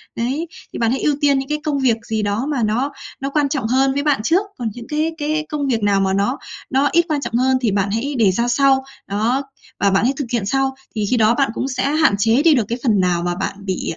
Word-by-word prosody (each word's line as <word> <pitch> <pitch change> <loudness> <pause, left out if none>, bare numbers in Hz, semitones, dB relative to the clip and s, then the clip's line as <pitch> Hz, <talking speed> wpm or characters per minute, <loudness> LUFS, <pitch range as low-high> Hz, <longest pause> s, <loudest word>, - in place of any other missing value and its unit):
Đấy, 270 +8 -2 0.3
thì - - -5
bạn 230 -1 +2
hãy 260 - -1
ưu 295 - +2
tiên 285 -2 +3
những 270 +1 -6
cái 300 - 0
công 295 -3 -1
việc 250 -4 +2
gì 220 -1 0
đó 205 +5 -1
mà 260 -5 0
nó 235 +7 0 0.3
nó 275 - -2
quan 285 -1 +1
trọng 270 -7 -1
hơn 265 +3 +2
với 285 +1 -1
bạn 290 -6 +2
trước. 335 - +3 0.2
Còn 235 -3 -2
những 240 -2 -10
cái 310 +2 0
cái 310 0 -1
công 290 -2 -2
việc 230 -5 0
nào 200 -1 +3
mà 190 0 +1
nó 200 +7 0 0.3
nó 275 +2 +2
ít 340 0 +3
quan 300 -2 0
trọng - - -5
hơn, 260 +2 +3
thì 230 - +1
bạn 200 0 0
hãy 245 +7 -2
để 215 -5 +4
ra 235 +6 0
sau. 265 +2 +3 0.2
Đó. 225 +7 0 0.4
Và 200 - +3
bạn 195 - +2
hãy 255 +3 +2
thực 285 - -2
hiện 235 -5 0
sau. 270 +4 0 0.2
Thì 210 -1 0
khi 250 - +2
đó 225 +1 +4
bạn 275 -4 +1
cũng 260 - -2
sẽ 255 - -2
hạn 310 -7 +3
chế 225 +6 +3
đi 330 -2 +6
được 235 -5 +1
cái 235 - -2
phần 220 -7 +3
nào 175 -2 +1
mà 175 0 -1
bạn 180 - -3
bị, 190 -2 -2
255 Hz, 275 wpm, -19 LUFS, 215-280 Hz, 0.4 s, đi